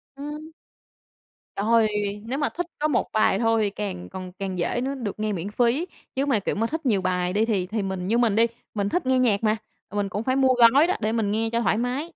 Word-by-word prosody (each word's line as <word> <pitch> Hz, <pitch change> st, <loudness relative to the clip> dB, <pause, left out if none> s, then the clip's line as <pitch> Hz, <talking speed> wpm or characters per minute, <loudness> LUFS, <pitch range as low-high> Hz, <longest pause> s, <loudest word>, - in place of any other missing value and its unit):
Ừm. 300 Hz, +3 st, -7 dB, 1.0 s
Trời! 220 Hz, +1 st, +3 dB, 0.4 s
Nếu 265 Hz, +3 st, -2 dB
mà 290 Hz, -, 0 dB
thích 350 Hz, -1 st, -4 dB
có 305 Hz, -, +2 dB
một 260 Hz, -6 st, 0 dB
bài 215 Hz, +1 st, +3 dB
thôi 225 Hz, -1 st, +2 dB
thì 205 Hz, -, +1 dB
càng 195 Hz, -, -5 dB
còn 185 Hz, -1 st, -7 dB
càng 190 Hz, -2 st, -3 dB
dễ 175 Hz, +7 st, -1 dB
nữa 275 Hz, +1 st, -2 dB
được 215 Hz, -5 st, -5 dB
nghe 215 Hz, -1 st, -1 dB
miễn 185 Hz, +2 st, -4 dB
phí, 245 Hz, +9 st, +1 dB, 0.3 s
chứ 275 Hz, +1 st, +1 dB
mà, 250 Hz, -7 st, +2 dB
kiểu -, -, -2 dB
mà, 225 Hz, +2 st, 0 dB
thích 320 Hz, +1 st, -4 dB
nhiều 205 Hz, -6 st, +2 dB
bài 180 Hz, 0 st, 0 dB
đi 215 Hz, +2 st, +2 dB
thì 195 Hz, -5 st, 0 dB
thì 215 Hz, +1 st, -2 dB
mình 190 Hz, -1 st, -3 dB
như 230 Hz, +3 st, +2 dB
mình 230 Hz, -4 st, +3 dB
đi, 230 Hz, +1 st, +5 dB, 0.3 s
mình 200 Hz, -1 st, -1 dB
thích 355 Hz, -, -1 dB
nghe 260 Hz, 0 st, +3 dB
nhạc 225 Hz, -4 st, +2 dB
mà, 215 Hz, 0 st, +3 dB, 0.3 s
mà 205 Hz, -, -10 dB
mình 200 Hz, -1 st, 0 dB
cũng 205 Hz, +4 st, -3 dB
phải 260 Hz, +1 st, +1 dB
mua 265 Hz, -1 st, +4 dB
gói 245 Hz, +7 st, +6 dB
đó 370 Hz, -, +1 dB
để 215 Hz, 0 st, 0 dB
mình 220 Hz, -3 st, 0 dB
nghe 225 Hz, +1 st, 0 dB
cho 235 Hz, 0 st, +1 dB
thoải 220 Hz, -, +2 dB
mái. 255 Hz, +7 st, -2 dB
225 Hz, 250 wpm, -25 LUFS, 200-260 Hz, 1.0 s, gói